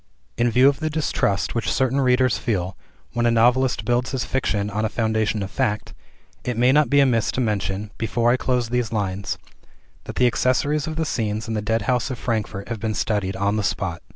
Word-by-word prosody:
In 120 +1 +2
view 125 +3 +5
of 140 0 +2
the 155 -1 -1
distrust 145 -10 0
which 115 - -1
certain 130 +1 +1
readers 130 -1 +3
feel, 95 -5 -2 0.4
when 120 0 +1
a - - +4
novelist 120 -1 +3
builds 120 +2 0
his 125 -3 -1
fiction 105 -6 -1
on 105 +1 -1
a 110 - +1
foundation 110 -2 0
of 95 - -6
fact, 110 -5 -1 0.5
it 125 -2 -3
may 125 +2 +4
not 150 +1 +4
be 140 - +4
amiss 120 -5 +2
to - - -2
mention 105 -3 -1
(before 115 +1 +1
I - - +4
close 125 -2 0
these 120 -2 -1
lines), 100 -3 -2 0.7
that - - -7
the 125 - +3
accessories 140 +5 +1
of 160 - -4
the 160 0 -1
scenes 110 -5 -2
in 115 - -3
the 105 - -1
Deadhouse 115 +4 0
of 130 - -4
Frankfort 110 -4 -3
have 115 -2 -3
been 110 0 -2
studied 100 -4 -1
on 100 +2 0
the 105 - 0
spot. 95 -4 -2
115 Hz, 210 wpm, -22 LUFS, 105-125 Hz, 0.7 s, view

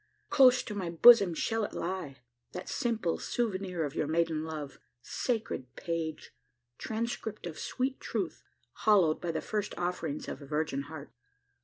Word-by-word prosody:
Close 255 -2 +6
to 210 - -6
my 190 -4 -3
bosom 200 +2 +8
shall 225 +6 0
it - - -3
lie 170 -6 -4 0.4
that 180 - -6
simple 220 -8 -1
souvenir 190 -7 -1
of 145 -2 -3
your 155 - -1
maiden 160 0 +1
love. 155 -3 -6 0.2
Sacred 215 - -3
page! 165 -2 -4 0.5
Transcript 220 -2 -3
of 165 -3 -6
sweet 260 +1 -2
truth - - -3 0.4
hallowed 190 -8 +5
by 175 - -1
the 160 -1 -2
first 210 +4 -3
offerings 175 -4 -2
of - - -6
a - - -9
virgin 150 -2 -1
heart! 155 -3 -8
175 Hz, 150 wpm, -31 LUFS, 155-220 Hz, 0.5 s, bosom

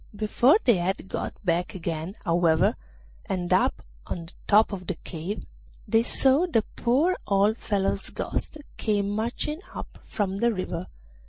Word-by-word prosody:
Before 240 - +4
they 240 -6 +5
had 185 +2 -2
got - - -3
back 175 +1 0
again, 170 +1 -4
however, 165 -2 +3 0.5
and 180 -2 -1
up - - +2 0.2
on 165 -1 -5 0.2
top 215 +1 +5
of 185 -2 -6
the 190 - -1
cave, 175 +6 -6 0.4
they 225 - +4
saw 270 +7 +3
the 230 -11 +2
poor 285 +10 +2
old 205 +3 +3
fellow's 200 -2 -1
ghost - - -3 0.2
come 205 -2 +1
marching 240 - -1
up - - -8
from 195 -2 -2
the 235 +3 +3
river. 185 -3 -3
200 Hz, 145 wpm, -26 LUFS, 180-230 Hz, 0.5 s, they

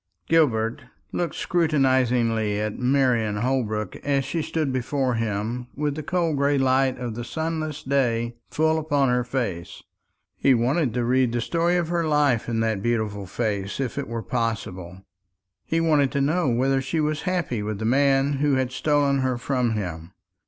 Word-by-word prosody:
Gilbert 115 -9 +2 0.3
looked 175 -1 -2
scrutinisingly 125 - +1
at 105 0 -3
Marian 125 -5 +2
Holbrook 110 -4 -1
as 140 -2 0
she 160 +4 -2
stood 155 -3 -2
before 130 0 0
him 115 +2 -2
with 150 0 -1
the 155 - -5
cold 165 -1 0
gray 140 +1 +2
light 130 0 +2
of 120 -2 -4
the 120 +2 -5
sunless 160 +1 -3
day 120 -4 0 0.2
full 160 +1 +1
upon 145 -4 +1
her 125 0 +2
face. 115 -9 -4 0.6
He 135 - +4
wanted 125 +2 +1
to 120 -1 0
read 125 0 +2
the 120 - -1
story 170 +7 +1
of 170 -2 -1
her 170 -1 0
life 145 -7 +2
in 115 -1 0
that 110 -3 0
beautiful 105 -3 -1
face, 100 -1 -2
if 130 -4 -2
it - - -4
were 115 0 -4
possible. 95 -6 -3 0.6
He 165 - +1
wanted 150 -5 +3
to 140 - +1
know 155 +2 +1
whether 135 +3 +1
she 150 +5 -2
was 155 0 0
happy 175 - -1
with 105 0 -3
the 110 - -4
man 135 +3 +3
who 145 -1 +2
had 130 -1 0
stolen 140 0 +1
her 130 -2 0
from 125 -2 0
him. 90 -5 -5
130 Hz, 170 wpm, -24 LUFS, 115-145 Hz, 0.6 s, He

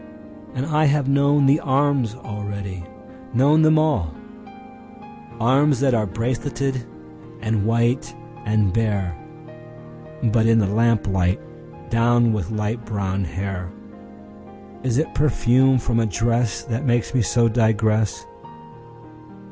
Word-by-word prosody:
And 130 +1 -2
I 155 0 +1
have 145 -1 +2
known 140 +1 +3
the 140 +3 +4
arms 135 -5 0
already, 100 -5 -6 0.5
known 145 +6 +4
them 155 0 +4
all—Arms 210 - -2
that 135 -2 +2
are 110 -3 +1
braceleted 120 +4 -3 0.6
and 110 -2 -1
white 120 +1 0 0.3
and 105 -4 +1
bare(But 105 - -4
in 115 0 +4
the 110 - +3
lamplight, 100 -4 +1 0.5
downed 120 0 +3
with 100 -6 -3
light 110 +2 -3
brown 100 -3 -3
hair!)Is 95 +6 -8
it 155 - -1
perfume 130 -2 +3
from 115 -1 0
a 115 - +1
dressThat 115 +2 -1
makes 120 -3 0
me 130 - +2
so 115 +4 +2
digress? 110 -2 +1
115 Hz, 105 wpm, -21 LUFS, 105-140 Hz, 0.6 s, the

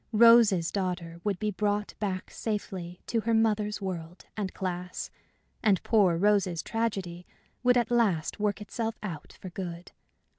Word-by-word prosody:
Rose's 220 -6 +6
daughter 175 -3 -3
would 205 -3 0
be 210 +2 -1
brought 205 +1 -1
back 190 -3 -3
safely 185 -5 -4
to 230 - 0
her 230 +1 +1
mother's 210 -2 +1
world 175 -2 -5
and 200 -3 -2
class, 180 -1 -4 0.5
and 200 -4 +3
poor 195 -7 +4
Rose's 190 -3 +2
tragedy 195 -6 -2 0.3
would 250 0 +4
at 240 0 +1
last 210 -8 +1
work 205 -1 0
itself 225 +2 -3
out 165 -8 -6
for 185 - -8
good. 175 -1 -6
200 Hz, 145 wpm, -29 LUFS, 180-215 Hz, 0.5 s, Rose's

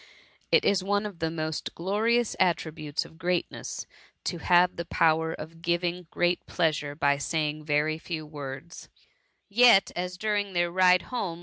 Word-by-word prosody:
It - - +4
is 195 -2 +2
one 205 +2 0
of 200 -5 -7
the 160 - 0
most 155 -1 -4
glorious 220 +6 +1
attributes 155 -4 0
of 160 - -16
greatness^ 175 0 -2 0.4
to 175 - -3
have 180 +1 +4
the 170 - -4
power 160 -1 +2
of 165 +1 -9
giving 175 0 -1
great 175 0 0
pleasure 150 -4 0
by 140 -2 +2
saying 155 0 -2
very 150 +1 +1
few 160 -2 -5
words; 145 +1 -8 0.6
yet, 225 -1 +6
as 180 0 -3
during 205 -1 -1
their 175 -1 +1
ride 180 0 +4
home. 175 -9 -2
170 Hz, 150 wpm, -27 LUFS, 155-185 Hz, 0.6 s, yet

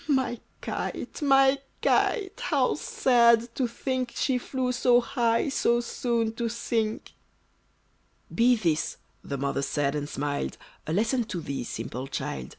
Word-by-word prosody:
My 260 -5 +1 0.2
kite! - - -4
my 270 -1 +5 0.2
kite! 415 -1 +1
how 275 - +2
sad 235 -4 +3
to 255 0 0
think 255 +1 -3
She 260 -2 +1
flew 255 0 -2
so 245 0 +4
high, 240 -1 +1
so 240 -3 +2
soon 235 -1 -1
to 235 -1 -1
sink!" 225 -1 -2 1.2
"Be 245 +2 +5
this," 165 -8 0 0.3
the 140 - -4
mother 140 0 -1
said, 140 0 0
and 145 -1 -3
smiled, 145 0 -3 0.3
"A 155 - -1
lesson 230 +5 +1
to 210 -5 -4
thee, 140 -5 -4
simple 120 +3 -5
child! 65 - -4
235 Hz, 140 wpm, -27 LUFS, 165-255 Hz, 1.2 s, my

